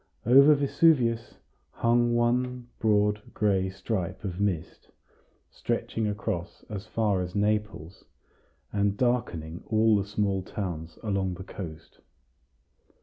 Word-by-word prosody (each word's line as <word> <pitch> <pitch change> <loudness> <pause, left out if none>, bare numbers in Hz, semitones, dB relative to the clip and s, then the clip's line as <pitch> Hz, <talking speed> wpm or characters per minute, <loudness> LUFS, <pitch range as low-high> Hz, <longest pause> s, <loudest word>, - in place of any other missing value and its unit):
Over 140 +5 +7
Vesuvius 135 -5 +2 0.3
hung 120 0 +2
one 125 +1 0
broad 105 -1 +2
gray 95 -3 +1
stripe 95 -1 -4
of 95 -2 -4
mist, 95 -6 -2 0.6
stretching 110 -1 -2
across 100 -4 -4
as 105 0 -6
far 105 -4 +1
as 90 +1 -5
Naples, 105 -4 -1 0.7
and 100 0 +1
darkening 100 -10 -1
all 110 0 +4
the 100 -1 0
small 100 -2 0
towns 85 -4 -5
along 100 -3 -1
the 95 - -8
coast. 80 -4 -9
105 Hz, 110 wpm, -27 LUFS, 95-115 Hz, 0.7 s, Over